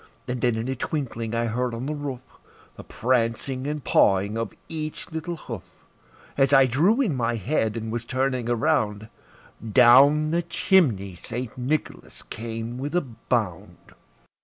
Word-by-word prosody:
And 125 Hz, -1 st, -3 dB
then 120 Hz, -2 st, +2 dB
in 110 Hz, +2 st, -3 dB
a 130 Hz, -, -2 dB
twinkling 120 Hz, -5 st, -3 dB
I 115 Hz, 0 st, +1 dB
heard 120 Hz, +1 st, -1 dB
on 120 Hz, +3 st, -5 dB
the 150 Hz, -, -2 dB
roof, 145 Hz, -4 st, -5 dB, 0.5 s
The -, -, -10 dB
prancing 130 Hz, +2 st, -1 dB
and 150 Hz, -1 st, -3 dB
pawing 100 Hz, 0 st, +3 dB
of 115 Hz, -2 st, -2 dB, 0.2 s
each 155 Hz, +1 st, -6 dB
little 160 Hz, +2 st, -4 dB
hoof. -, -, -7 dB, 0.7 s
As 135 Hz, 0 st, +3 dB
I 135 Hz, -1 st, +7 dB
drew 170 Hz, -, +3 dB
in 200 Hz, -, +1 dB
my 120 Hz, -1 st, 0 dB
head, 110 Hz, 0 st, -1 dB
and 110 Hz, -1 st, -4 dB
was 120 Hz, 0 st, -3 dB
turning 130 Hz, -1 st, -1 dB
around, 110 Hz, -5 st, 0 dB, 0.6 s
Down 140 Hz, +6 st, +6 dB
the 170 Hz, +1 st, +2 dB
chimney 150 Hz, -, +2 dB
St. 115 Hz, +7 st, -6 dB
Nicholas 135 Hz, +4 st, -3 dB
came 115 Hz, +2 st, -6 dB
with 145 Hz, +5 st, -4 dB
a 175 Hz, -, +3 dB
bound. 115 Hz, -, -3 dB
125 Hz, 155 wpm, -25 LUFS, 115-145 Hz, 0.7 s, I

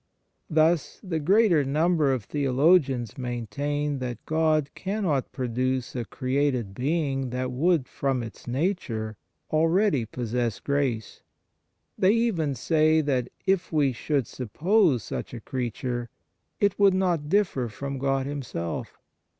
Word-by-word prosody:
Thus, 160 Hz, +1 st, +2 dB
the 175 Hz, -5 st, -2 dB
greater 180 Hz, -1 st, +4 dB
number 155 Hz, +1 st, +2 dB
of 130 Hz, -5 st, -1 dB
theologians 135 Hz, -, +2 dB
maintain 140 Hz, +5 st, -2 dB
that 125 Hz, -2 st, -5 dB
God 155 Hz, -2 st, +1 dB
cannot 190 Hz, -9 st, -1 dB
produce 130 Hz, 0 st, -2 dB
a 120 Hz, -2 st, -2 dB
created 130 Hz, -5 st, -1 dB
being 135 Hz, +1 st, -1 dB
that 125 Hz, +1 st, -2 dB
would 150 Hz, +1 st, +2 dB
from 135 Hz, -3 st, -1 dB
its 115 Hz, +1 st, -10 dB
nature 120 Hz, -, -2 dB, 0.4 s
already 165 Hz, -, +3 dB
possess 120 Hz, -2 st, -2 dB
grace; 135 Hz, -6 st, -2 dB, 0.8 s
they 190 Hz, +2 st, +5 dB
even 185 Hz, -, +1 dB
say 155 Hz, +2 st, +3 dB
that, 130 Hz, -5 st, 0 dB, 0.2 s
if 190 Hz, -2 st, +1 dB
we 145 Hz, -4 st, +3 dB
should 140 Hz, +2 st, -1 dB
suppose 150 Hz, -, +1 dB
such -, -, -5 dB
a -, -, -6 dB
creature, 120 Hz, -1 st, -3 dB, 0.5 s
it 200 Hz, -1 st, +1 dB
would 200 Hz, -2 st, +5 dB
not 175 Hz, -6 st, 0 dB
differ 175 Hz, -10 st, +1 dB
from 140 Hz, +5 st, -5 dB
God 135 Hz, 0 st, 0 dB
Himself. 135 Hz, -, -5 dB
140 Hz, 125 wpm, -26 LUFS, 125-160 Hz, 0.8 s, they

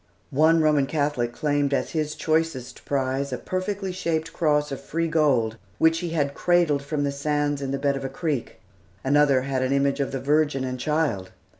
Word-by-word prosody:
One 160 Hz, +4 st, +4 dB
Roman 150 Hz, -3 st, +3 dB
Catholic 145 Hz, -5 st, 0 dB
claimed 145 Hz, +1 st, 0 dB
as -, -, -2 dB
his 155 Hz, -1 st, -2 dB
choicest 160 Hz, -5 st, -1 dB
prize 135 Hz, 0 st, -1 dB
a 125 Hz, -, -2 dB
perfectly 190 Hz, +3 st, -3 dB
shaped 165 Hz, -3 st, -2 dB
cross 150 Hz, -3 st, +1 dB
of 135 Hz, -, -5 dB
free 165 Hz, +1 st, -2 dB
gold, 135 Hz, -9 st, +2 dB, 0.2 s
which 160 Hz, 0 st, +3 dB
he 175 Hz, -, -3 dB
had 145 Hz, -4 st, 0 dB
cradled 170 Hz, -5 st, +2 dB
from 145 Hz, +1 st, -2 dB
the 140 Hz, -, 0 dB
sands 145 Hz, 0 st, -1 dB
in 135 Hz, -, -3 dB
the 140 Hz, -, -1 dB
bed 140 Hz, 0 st, +1 dB
of 135 Hz, -, -5 dB
a 135 Hz, -, -3 dB
creek. 140 Hz, -2 st, -3 dB, 0.4 s
Another 140 Hz, -1 st, +4 dB
had 135 Hz, -1 st, -1 dB
an 130 Hz, 0 st, 0 dB
image 140 Hz, 0 st, +1 dB
of 140 Hz, -, -1 dB
the 135 Hz, -, -3 dB
Virgin 145 Hz, 0 st, +1 dB
and 130 Hz, -1 st, -4 dB
Child. 140 Hz, -10 st, 0 dB
145 Hz, 190 wpm, -24 LUFS, 135-155 Hz, 0.4 s, One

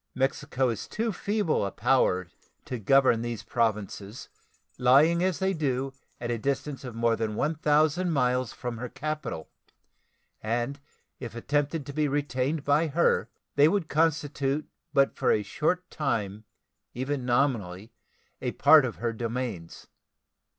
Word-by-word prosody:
Mexico 135 Hz, -1 st, 0 dB
is 115 Hz, -, -4 dB
too 225 Hz, +1 st, -2 dB
feeble 205 Hz, -, 0 dB
a 100 Hz, -, -1 dB
power 100 Hz, -6 st, +2 dB, 0.4 s
to 125 Hz, -, -4 dB
govern 130 Hz, +1 st, +4 dB
these 120 Hz, -2 st, -4 dB
Provinces, 105 Hz, -2 st, -2 dB, 0.5 s
lying 145 Hz, +7 st, +5 dB
as 185 Hz, -4 st, +1 dB
they 190 Hz, 0 st, 0 dB
do 135 Hz, -4 st, -1 dB, 0.3 s
at 120 Hz, 0 st, -3 dB
a 120 Hz, -, -1 dB
distance 140 Hz, +3 st, -2 dB
of 125 Hz, -3 st, -7 dB
more 115 Hz, 0 st, +2 dB
than 110 Hz, -1 st, -2 dB
1,000 155 Hz, +4 st, +2 dB
miles 125 Hz, -5 st, +1 dB
from 120 Hz, -2 st, -6 dB
her 125 Hz, 0 st, -5 dB
capital, 150 Hz, -, -5 dB, 0.9 s
and 120 Hz, +5 st, -2 dB, 0.4 s
if 120 Hz, -3 st, -7 dB
attempted 145 Hz, +4 st, -1 dB
to 140 Hz, -, -7 dB
be 150 Hz, +1 st, +1 dB
retained 140 Hz, +1 st, -1 dB
by 145 Hz, +3 st, +3 dB
her 165 Hz, +3 st, +2 dB, 0.3 s
they 145 Hz, +2 st, +6 dB
would 175 Hz, -2 st, 0 dB
constitute 150 Hz, -2 st, 0 dB, 0.2 s
but 140 Hz, 0 st, +3 dB
for -, -, +2 dB
a 105 Hz, -, +2 dB
short 180 Hz, -, -1 dB
time 110 Hz, -7 st, -2 dB, 0.5 s
even 130 Hz, +2 st, -2 dB
nominally 120 Hz, -6 st, 0 dB, 0.5 s
a -, -, -2 dB
part 155 Hz, -4 st, +6 dB
of 120 Hz, -, -4 dB
her 115 Hz, -1 st, -2 dB
dominions. 115 Hz, -7 st, -4 dB
135 Hz, 140 wpm, -27 LUFS, 115-150 Hz, 0.9 s, they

